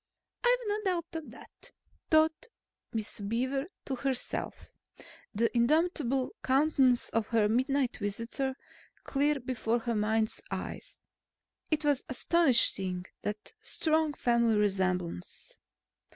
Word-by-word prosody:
"I've - - +5
no 415 0 0
doubt 360 -4 0
of 320 -2 -5
that," - - -14 0.4
thought 315 +8 +3 0.4
Miss 220 -2 -3
Beaver 255 +8 -1 0.2
to 270 - -2
herself, 265 -1 -3 0.6
the 230 +2 0
indomitable 270 0 +2
countenance 265 -2 +3
of 225 -1 0
her 225 -3 +3
midnight 260 +3 +1
visitor 230 +6 -3 0.5
clear 290 +1 +1
before 240 -2 -1
her 235 +1 -1
mind's 220 +1 0
eye. - - -4 0.9
It 310 -1 0
was 290 -3 +2
astonishing, 235 - +3 0.2
that 210 0 -5
strong 315 -6 +1
family 235 -3 +2
resemblance. 185 - -1
255 Hz, 110 wpm, -30 LUFS, 220-300 Hz, 0.9 s, I've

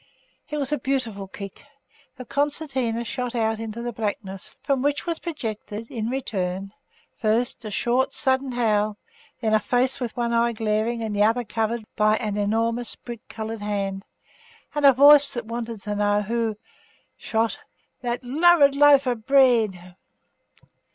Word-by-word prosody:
It 300 - -3
was 280 -1 -2
a 295 - 0
beautiful 235 -7 -2
kick, 195 0 -9 0.5
the 255 - -8
concertina 275 -4 -1
shot 250 0 -4
out 220 -1 0
into 225 +1 -5
the 240 - -3
blackness, 205 -3 -5
from 275 -2 +1
which 285 +1 0
was 335 -2 -2
projected, 225 - -6
in 225 -2 -3
return, 195 -7 -3 0.5
first 230 +2 0
a - - -4
short, 240 +5 +1
sudden 265 -2 +1
howl, 215 -3 +1 0.4
then 220 -2 +1
a 215 - +5
face 255 +4 +1
with 245 -2 -4
one 235 -1 0
eye 235 0 +2
glaring 220 +1 -1
and 215 -2 -3
the 205 - +1
other 225 +3 +3
covered 225 +1 -2
by 215 0 +3
an 210 -3 -3
enormous 225 +3 0
brick 235 -2 -10
coloured 220 0 -5
hand, 195 -2 -2 0.7
and 295 -1 +4
a - - +9
voice 285 +2 +7
that 240 - -4
wanted 230 -1 -5
to 210 0 -4
know 205 0 +2
who 225 0 -1 0.6
shot 225 0 -1 0.4
'that 245 0 -3
lurid 290 +2 +5
loaf 285 -1 +6
of 240 -4 -2
bread? 225 -10 +3
230 Hz, 155 wpm, -24 LUFS, 215-260 Hz, 0.7 s, a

